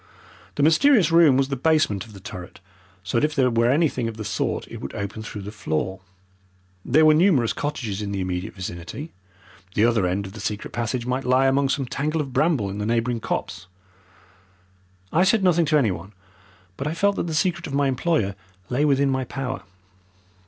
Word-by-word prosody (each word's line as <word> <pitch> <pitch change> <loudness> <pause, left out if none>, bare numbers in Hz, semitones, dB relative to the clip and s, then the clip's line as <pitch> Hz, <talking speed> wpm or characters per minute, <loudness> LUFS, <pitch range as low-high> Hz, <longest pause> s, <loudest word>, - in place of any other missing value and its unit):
The 145 - +1
mysterious 180 - +5
room 165 -5 +6
was 135 0 +1
the 135 - -1
basement 135 - +1
of 110 - -15
the 100 - -11
turret, 95 -4 -9 0.4
so 95 +5 0
that - - -2
if 150 0 +1
there 130 -3 +3
were 115 +1 +2
anything 135 -4 +1
of 115 -1 -6
the 110 - -6
sort 100 -3 -2
it - - -8
would 65 - -7
open 100 +1 -5
through 105 -2 -7
the 105 - -7
floor. 95 -1 -3 0.8
There 155 +5 +4
were 155 - +7
numerous 155 - +3
cottages 115 -9 -3
in 100 -1 -4
the 100 - -2
immediate 90 +3 -3
vicinity. 90 - -7 0.6
The 105 - +4
other 115 -6 +2
end 95 +3 -1
of 95 - -9
the 110 - -9
secret 105 -1 -4
passage 120 +1 -2
might 125 +2 -1
lie 130 +1 +3
among 135 +1 +2
some 135 0 0
tangle 150 +6 -2
of 135 -4 -4
bramble 135 -6 +2
in 100 - -5
the 105 - -2
neighbouring 115 +1 0
copse. 90 -4 -4 1.5
I 170 +4 +4
said 205 +1 +3
nothing 175 -2 +4
to 155 +1 +4
anyone, 100 - -1 0.6
but 135 - -3
I 155 - -2
felt 200 +3 +2
that - - -1
the 160 - -3
secret 170 +1 0
of 140 - -7
my 140 0 +2
employer 130 - 0 0.4
lay 130 +4 +1
within 140 -1 +3
my 130 0 0
power. 130 -3 -4
125 Hz, 200 wpm, -23 LUFS, 105-150 Hz, 1.5 s, were